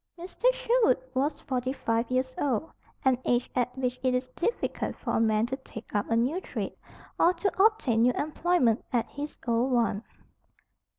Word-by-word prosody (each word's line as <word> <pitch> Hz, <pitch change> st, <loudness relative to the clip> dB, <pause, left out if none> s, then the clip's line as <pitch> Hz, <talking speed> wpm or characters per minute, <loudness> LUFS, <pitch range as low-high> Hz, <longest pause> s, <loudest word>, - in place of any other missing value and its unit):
Mr. 375 Hz, +8 st, +1 dB
Sherwood -, -, +3 dB, 0.2 s
was 275 Hz, +4 st, 0 dB
forty 255 Hz, -1 st, -2 dB
five 230 Hz, -3 st, -1 dB
years 255 Hz, 0 st, 0 dB
old, 285 Hz, +2 st, 0 dB, 0.3 s
an 260 Hz, -2 st, +4 dB
age 245 Hz, 0 st, +1 dB
at 250 Hz, 0 st, -1 dB
which 250 Hz, -1 st, -1 dB
it 255 Hz, -1 st, +2 dB
is 255 Hz, 0 st, -2 dB
difficult 345 Hz, -, -2 dB
for -, -, -4 dB
a -, -, +2 dB
man 220 Hz, -1 st, +3 dB
to 260 Hz, +2 st, -3 dB
take 230 Hz, -4 st, -11 dB
up 205 Hz, -1 st, 0 dB
a 230 Hz, -, +2 dB
new 260 Hz, +11 st, +1 dB
trade, -, -, -5 dB, 0.4 s
or 355 Hz, +2 st, +5 dB
to 385 Hz, +2 st, +1 dB
obtain 415 Hz, -, +3 dB
new 250 Hz, +1 st, +4 dB
employment 300 Hz, -6 st, +1 dB
at 235 Hz, -2 st, +1 dB
his 290 Hz, +1 st, -6 dB
old 235 Hz, +3 st, +2 dB
one. 230 Hz, -3 st, +1 dB
255 Hz, 175 wpm, -28 LUFS, 235-315 Hz, 0.4 s, or